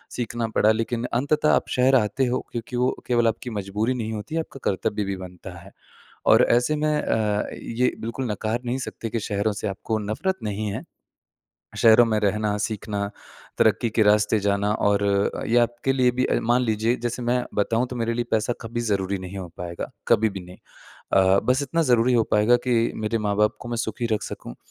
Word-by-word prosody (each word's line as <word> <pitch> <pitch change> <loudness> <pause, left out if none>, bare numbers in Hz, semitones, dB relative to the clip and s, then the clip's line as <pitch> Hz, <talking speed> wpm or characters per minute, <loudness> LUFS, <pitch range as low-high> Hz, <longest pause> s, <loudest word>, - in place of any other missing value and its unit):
सीखना 115 -1 -2
पड़ा 110 - +5
लेकिन 115 +2 -1
अंततः 150 +5 +2
आप - - +1
शहर 130 +2 +4
आते 125 +2 +2
हो 125 0 0
क्योंकि 120 +1 -5
वो 125 +1 +2 0.2
केवल 120 -2 +3
आपकी 115 +2 -2
मजबूरी 105 +6 -1
नहीं 110 -3 -3
होती 110 +10 -5
है, 165 - +1
आपका 135 - -11
कर्तव्य 105 +2 -2
भी 100 - -2
बनता 90 -1 -10
है। - - -14 0.6
और - - +7
ऐसे 125 +6 +3
में 150 0 +1
अ, 105 -2 0
ये 125 +2 -1
बिल्कुल 115 +1 -3
नकार 110 +3 -2
नहीं 120 +2 -1
सकते 115 -3 -5
कि 115 - -2
शहरों 105 0 -1
से 105 +1 -4
आपको 105 +3 -2
नफ़रत 110 - -2
नहीं 105 0 -3
है। - - -5 1.0
शहरों 115 +1 +7
में 110 -1 +1
रहना, 105 0 0
सीखना, 105 -1 -3 0.5
तरक्की 115 - +3
के 110 +1 +2
रास्ते 105 +1 +3
जाना 100 +1 +1
और 100 -1 +1
अ, 100 0 0
ये 120 +2 +3
आपके 120 +3 +1
लिए 125 -2 +3
भी 130 +1 0
अ, - - +1
मान 120 +2 +2
लीजिए 110 +1 +1
जैसे 120 +1 -3
मैं 120 +1 +1
बताऊँ, 115 +4 +1
तो 125 - -6
मेरे 115 0 -1
लिए 120 0 -1
पैसा 110 +2 +1
कभी 120 0 -4
ज़रूरी 95 0 -1
नहीं 95 +1 -8
हो 90 -2 -6
पाएगा, 85 -1 -5 0.2
कभी 110 +1 +4
भी 95 - -6
नहीं। 90 +1 -12 0.6
अ, 95 0 +5
बस 130 +3 +2
इतना 165 +4 0
ज़रूरी 120 +1 +4
हो 115 -2 +4
पाएगा 105 +3 +5
कि 115 -2 +2
मेरे 110 +1 -1
माँ-बाप 105 +1 +2
को 120 - -8
मैं 120 - -2
सुखी 120 +1 -2
रख 105 - -1
सकूँ - - -7
115 Hz, 200 wpm, -24 LUFS, 105-120 Hz, 1.0 s, और